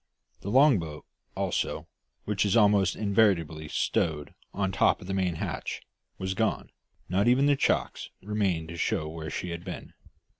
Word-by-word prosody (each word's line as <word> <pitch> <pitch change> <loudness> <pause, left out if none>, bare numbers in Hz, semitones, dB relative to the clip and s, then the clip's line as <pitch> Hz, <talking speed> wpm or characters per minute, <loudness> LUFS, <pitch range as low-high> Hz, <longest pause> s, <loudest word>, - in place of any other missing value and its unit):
The 100 - -6
long 135 -1 +5
boat, 75 -2 -7 0.3
also, - - -2 0.4
which 105 -1 0
is 100 +1 +2
almost 100 -4 +4
invariably 95 -8 +1
stowed 75 -1 -1 0.2
on 95 -1 -1
top - - +3
of - - -11
the 95 - -3
main 95 -3 0
hatch, - - -4 0.3
was 95 0 -2
gone, 110 +3 -1 0.4
not 95 +4 +1
even 125 +3 +4
the 145 0 +4
chocks - - 0
remaining 100 -5 0
to 85 - -7
show 75 -1 -1
where 80 0 -6
she 90 - -4
had 85 0 -6
been. - - -8
95 Hz, 160 wpm, -28 LUFS, 85-105 Hz, 0.4 s, long